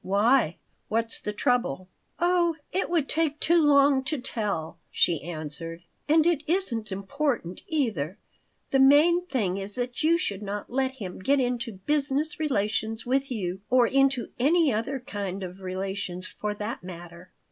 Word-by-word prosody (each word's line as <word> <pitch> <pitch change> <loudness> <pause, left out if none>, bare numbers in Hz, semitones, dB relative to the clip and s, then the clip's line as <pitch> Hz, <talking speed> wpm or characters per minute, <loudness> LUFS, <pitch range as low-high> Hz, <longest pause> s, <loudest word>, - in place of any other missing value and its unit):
"Why? 205 - +3 0.3
What's 230 +1 0
the 210 - -3
trouble?" 210 - 0 0.3
"Oh, 345 -1 +2 0.2
it 380 - -1
would 330 -5 +1
take 310 -2 0
too 340 +1 +4
long 280 -2 +5
to 310 +1 0
tell," 205 -10 -3
she 165 -4 +2
answered. 165 +1 -6 0.3
"And 315 +1 +5
it 340 -4 +2
isn't 250 - 0
important, 200 - -2
either. 220 - -1 0.5
The 270 - +3
main 315 +6 +5
thing 205 - -1
is 195 +1 0
that 245 0 -3
you 325 +2 +4
should 205 - -2
not 205 +1 -5
let 265 +1 0
him 200 -9 -7
get 275 +9 +2
into 245 -3 -1
business 290 - 0
relations 220 -5 -1
with 270 +3 0
you, 190 -5 -3
or 250 -1 +5
into 270 0 +2
any 305 +1 +3
other 230 +6 -2
kind 200 -5 -5
of 185 +1 -7
relations, 185 -1 -4
for 210 +2 -4
that 210 0 -5
matter." 175 0 -10
240 Hz, 155 wpm, -26 LUFS, 190-285 Hz, 0.5 s, long